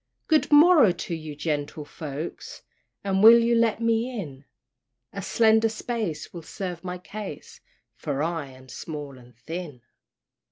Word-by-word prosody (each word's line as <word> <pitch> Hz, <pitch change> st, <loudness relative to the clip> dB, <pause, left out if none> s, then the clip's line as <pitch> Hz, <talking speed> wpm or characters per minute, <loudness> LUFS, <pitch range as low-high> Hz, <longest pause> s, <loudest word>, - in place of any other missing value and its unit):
"Good 310 Hz, -1 st, +2 dB
morrow 295 Hz, -, +7 dB
to 175 Hz, 0 st, -5 dB
ye, 155 Hz, -2 st, -6 dB
gentle 150 Hz, 0 st, -3 dB
folks, 150 Hz, +1 st, -7 dB, 0.4 s
And 195 Hz, -1 st, 0 dB
will 225 Hz, +2 st, +10 dB
you 235 Hz, 0 st, +2 dB
let 230 Hz, -1 st, +2 dB
me 230 Hz, +1 st, 0 dB
in? 140 Hz, -6 st, -8 dB, 0.7 s
A 200 Hz, -, -5 dB
slender 220 Hz, +2 st, +3 dB
space 220 Hz, -6 st, -4 dB
will 170 Hz, -, -7 dB
serve 175 Hz, 0 st, -6 dB
my 180 Hz, 0 st, -4 dB
case, 195 Hz, -3 st, -9 dB, 0.3 s
For 140 Hz, +2 st, -3 dB
I 165 Hz, -3 st, -2 dB
am 130 Hz, 0 st, -15 dB
small 145 Hz, +1 st, -7 dB
and 125 Hz, -1 st, -18 dB
thin." 150 Hz, -2 st, -7 dB
175 Hz, 145 wpm, -25 LUFS, 150-225 Hz, 0.7 s, will